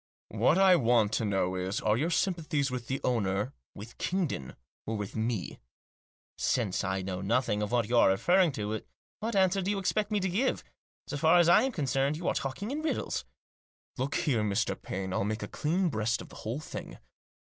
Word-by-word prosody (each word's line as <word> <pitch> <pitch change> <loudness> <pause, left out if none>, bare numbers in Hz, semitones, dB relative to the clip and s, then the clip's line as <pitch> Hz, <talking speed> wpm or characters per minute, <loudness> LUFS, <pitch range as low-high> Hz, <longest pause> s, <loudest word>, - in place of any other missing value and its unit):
" - - -
What 170 - +3
I 190 -2 +6
want 115 -5 +3
to 115 - 0
know 95 -3 0
is, 95 +1 -2
are 105 0 +2
your 150 +8 0
sympathies 165 -6 0
with 125 -2 -4
the 135 - -2
owner, 105 0 0 0.2
with 110 +4 -11
Kingdon, 170 - -2 0.3
or 110 - -1
with 105 -1 -5
me?" 110 -3 -2 0.4
" - - -78
Since 110 -7 0
I 95 0 -1
know 90 -1 -4
nothing 105 +1 +1
of 105 - -2
what 120 -3 +1
you 120 - 0
are - - +6
referring 175 - +3
to, 105 -1 -3 0.4
what 225 0 -3
answer 190 0 +3
do 190 - -2
you 205 - 0
expect 205 +2 0
me 210 -1 +1
to 190 - 0
give? 215 +9 0 0.4
So 145 - -4
far 160 +4 +5
as 175 -1 +5
I 175 - +7
am 265 - 0
concerned, 140 - 0
you 170 - -4
are - - +2
talking 140 - -3
in 300 +2 -2
riddles." 315 - -2 0.4
" - - -38
Look 135 +2 -1
here, 125 -7 +1
Mr. 100 -2 0
Paine, 95 0 -5
I'll - - 0
make 110 +1 -2
a - - -4
clean 175 - 0
breast 110 -2 0
of - - -14
the - - -12
whole 115 +6 -4
thing. - - -8
125 Hz, 215 wpm, -30 LUFS, 105-175 Hz, 0.4 s, I